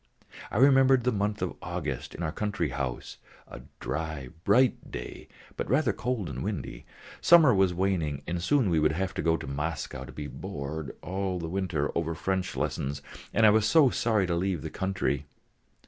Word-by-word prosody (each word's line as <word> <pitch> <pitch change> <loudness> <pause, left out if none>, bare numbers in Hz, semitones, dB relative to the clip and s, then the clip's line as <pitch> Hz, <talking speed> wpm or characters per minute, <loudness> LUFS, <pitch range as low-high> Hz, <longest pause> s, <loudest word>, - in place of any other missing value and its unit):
I - - -3
remembered 135 -1 +6
the 125 - +2
month 105 -1 -1
of - - -2
August - - -4
in 85 - -5
our 80 - -1
country 100 -4 -2
house: 65 -1 -4 0.3
a 60 - -10 0.2
dry 80 -5 -4 0.2
bright 125 +5 +3
day - - -7 0.3
but - - -4
rather 130 -2 +3
cold 120 -4 -2
and 65 -4 -5
windy; 100 -7 -5 0.3
summer 165 -7 +7
was 95 -2 +3
waning 85 -6 -1
and 85 0 -3
soon 120 0 +2
we 80 - +3
should 75 0 +3
have 95 +2 -2
to - - -2
go 80 0 +2
to - - -8
Moscow 70 -1 -4
to 65 - -10
be 75 +3 -6
bored 70 +1 -6
all 95 +1 -2
the 85 -2 -4
winter 90 -5 -1
over 85 -1 -1
French 95 +2 -2
lessons, 70 +1 -2 0.3
and 110 - +4
I 105 - +8
was 110 0 +3
so 145 -1 +5
sorry 110 -4 +1
to 85 - -1
leave 90 -4 -1
the - - -5
country. 90 -7 -1
90 Hz, 185 wpm, -28 LUFS, 75-105 Hz, 0.3 s, I